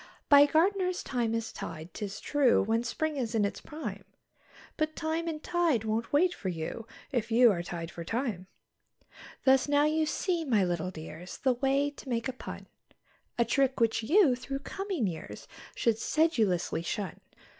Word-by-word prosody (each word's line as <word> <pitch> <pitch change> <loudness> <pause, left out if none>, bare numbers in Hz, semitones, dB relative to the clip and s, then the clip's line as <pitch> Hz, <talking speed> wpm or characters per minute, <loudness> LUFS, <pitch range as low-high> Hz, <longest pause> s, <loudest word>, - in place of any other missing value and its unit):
By 285 0 +8
gardeners 365 +3 +2
thyme 235 -3 -1
is 225 -1 -3
tied, 160 +1 -7
'tis 205 -1 -5
true, 285 -4 +3
when 225 +3 +1
spring 305 +5 -2
is 235 -3 -2
in 210 -2 +3
its 200 - -4
prime; 315 0 -6 0.7
But 310 0 -1
time 320 +1 -2
and 315 -2 -4
tide 335 -10 +1
won't 225 +1 -2
wait 350 +5 +3
for 190 - -4
you 175 +7 -5 0.2
if 240 -4 -1
you 235 0 +7
are 175 -3 -1
tied 170 -1 -6
for 170 - -7
time. 220 -3 -3 1.0
Thus 265 0 +4
now 290 0 +4
you 310 +1 +1
see, 345 +1 -1
my 225 -9 +2
little 175 0 -1
dears, 165 +1 -9
the 260 -2 +2
way 275 +3 +1
to 285 - -11
make 230 0 -1
a 260 - -3
pun; - - -8 0.7
A 235 - +3
trick 270 +2 +1
which 225 -1 +2
you, 300 - +4
through 275 +2 -5
coming 385 - -2
years, 170 -4 -6 0.3
should 225 -2 +1
sedulously 220 - +1
shun. 190 +1 -4
245 Hz, 170 wpm, -30 LUFS, 210-300 Hz, 1.0 s, By